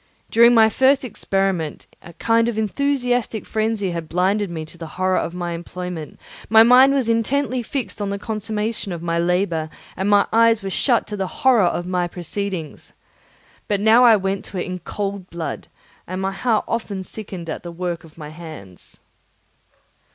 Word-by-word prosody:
During 235 +1 +6
my 220 -1 +7
first 265 +4 +3
experiment, 195 -7 -2 0.2
a 170 - -13
kind 230 +5 +2
of 225 - -4
enthusiastic 245 -1 0
frenzy 215 -3 -1
had 170 -2 -5
blinded 190 +3 +1
me 160 -2 -5
to 155 - -14
the 165 -1 -8
horror 185 0 +2
of 170 - -4
my 175 -1 -3
employment; 175 -1 -6 0.3
my 220 +1 +8
mind 250 +3 +7
was 270 -4 +1
intently 250 +3 0
fixed 240 -2 -5
on 200 - -1
the 200 - -2
consummation 215 -1 -3
of 170 -1 -7
my 170 0 0
labour, 170 -2 0 0.3
and 190 +2 -1
my 205 -1 +5
eyes 230 -1 +4
were 195 - -4
shut 240 +3 +2
to 210 - -5
the 190 -2 -2
horror 240 -1 +3
of 175 0 -2
my 180 -1 -1
proceedings. 175 -2 -5 0.7
But 205 -1 0
now 220 +4 +5
I 235 -2 +8
went 195 -1 -2
to 195 - -7
it 180 - -2
in 185 -1 -5
cold 200 -1 -5
blood, 170 -1 -5 0.4
and 185 +1 -4
my 190 0 -1
heart 220 +2 0
often 205 -4 -3
sickened 190 -4 -8
at 160 - -4
the 175 - -8
work 170 -1 -4
of 160 -1 -17
my 150 -2 -8
hands. 155 - -12
195 Hz, 180 wpm, -21 LUFS, 175-225 Hz, 0.7 s, my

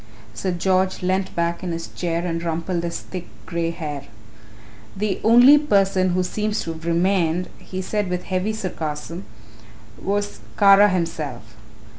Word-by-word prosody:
Sir 110 - -3
George 185 +1 +1
leant 185 +1 0
back 170 0 -1
in 180 - -2
his 165 0 -4
chair 170 0 -2
and 165 -1 -2
rumpled 170 +1 -2
his 170 0 -4
thick 180 -2 -7 0.2
grey 170 -1 -1
hair. 155 -5 -5 0.9
"The 205 -1 -1
only 245 +6 +8
person 195 -8 +2
who 185 - +2
seems 210 +3 -1
to 165 - -4
have 160 +1 -9
remained," 175 0 +1
he 185 0 -6
said 205 0 -1
with 180 0 -2
heavy 190 +3 -1
sarcasm, 170 -3 -5 0.8
"was 205 +1 -2 0.2
Kara 200 0 +7
himself. 155 - -3
180 Hz, 145 wpm, -22 LUFS, 165-195 Hz, 0.9 s, only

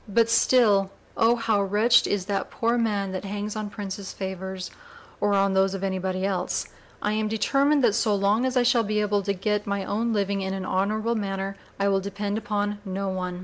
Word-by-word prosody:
But 230 +2 +3
still 215 -5 +4 0.3
'Oh! 230 +1 +4
how 225 -3 +1
wretched 210 +5 +4
Is 200 -3 -1
that 200 0 -2
poor 230 +1 0
man, 205 -5 0
that 185 0 -4
hangs 205 +1 -4
on 215 -1 -4
Princes' 200 -1 -6
favors,' 190 -1 -5 0.5
or 205 -1 +2
on 195 0 +2
those 190 0 +2
of 195 - -5
any 190 -1 -1
body 185 0 -2
else. 185 -2 -1 0.4
I 210 - +1
am 215 0 0
determined 275 +6 +2
that 230 -4 +4
so 215 -1 +2
long 200 +4 +2
as 260 0 0
I 250 - +4
shall 245 -1 +4
be 210 -1 -1
able 205 -1 +1
to 200 +1 -1
get 210 +2 -1
my 200 -1 -2
own 230 +3 -1
living 200 -2 0
in 190 0 -2
an 190 -1 -4
honorable 215 +5 0
manner, 195 -2 -3 0.2
I 200 - +2
will 195 -1 +3
depend 200 +2 -3
upon 205 -1 -2
no 195 0 -3
one. 180 -1 -4
205 Hz, 210 wpm, -25 LUFS, 195-215 Hz, 0.5 s, still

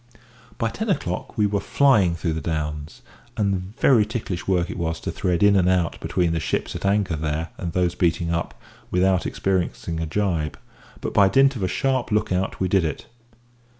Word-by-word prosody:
By 115 - 0
ten 220 - -4
o'clock 90 - -2
we 105 - +3
were 100 0 0
flying 100 -7 +3
through 85 -1 -2
the 80 - -3
Downs; 75 - -4 0.3
and 100 -1 -1
very 120 -6 +5
ticklish 105 -5 -4
work 90 -2 +1
it - - -6
was 80 -1 -2
to - - -3
thread 90 0 0
in 100 0 +6
and 90 -2 +3
out 90 -3 +1
between 85 -2 0
the 85 - 0
ships - - -2
at - - -2
anchor 100 -4 +1
there 80 +1 -2
and 85 -2 -3
those 90 -1 +1
beating 85 -1 0
up, 85 0 -3 0.3
without 95 0 +2
experiencing 85 -4 -2
a 80 - -2
jibe, 85 -4 -1 0.4
but - - -4
by 100 -1 +5
dint 135 +5 +4
of 115 - -5
a 95 - +1
sharp 130 +5 0
look 105 -1 +1
out 95 +1 -1
we 95 - +1
did 95 -1 +2
it. 80 - -3
90 Hz, 195 wpm, -23 LUFS, 85-105 Hz, 0.4 s, in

